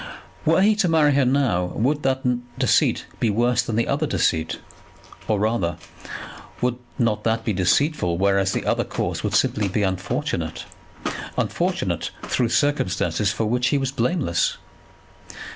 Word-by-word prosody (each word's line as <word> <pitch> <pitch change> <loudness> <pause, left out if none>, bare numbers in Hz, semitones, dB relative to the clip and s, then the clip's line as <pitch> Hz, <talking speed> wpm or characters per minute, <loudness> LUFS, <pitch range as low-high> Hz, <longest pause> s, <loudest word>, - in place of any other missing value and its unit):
Were 165 +4 +4
he 215 +1 +4
to 190 -5 +2
marry 155 -3 +4
her 140 -1 +3
now, 125 -9 +2
would 145 +7 0
not 130 0 0
that 120 -1 -2
deceit - - +2
be 115 - +2
worse 120 +4 +2
than 110 - -3
the 115 - +1
other 145 +3 0
deceit? 80 - 0 0.7
Or, 105 -2 +1
rather, 105 -5 0 0.8
would 125 0 0 0.2
not 115 -5 +1
that 115 0 0
be 110 - +1
deceitful, 90 - +1
whereas 95 0 +2
the - - -2
other - - +1
course - - -3
would - - -1
simply 105 -2 +2
be 100 +2 0
unfortunate, 95 -2 -2 0.7
unfortunate - - -1
through 120 -3 0
circumstances 95 - +1
for 110 - -1
which 125 +3 +1
he 140 - +2
was 135 -1 -1
blameless? 125 - 0
120 Hz, 150 wpm, -23 LUFS, 100-140 Hz, 0.8 s, Were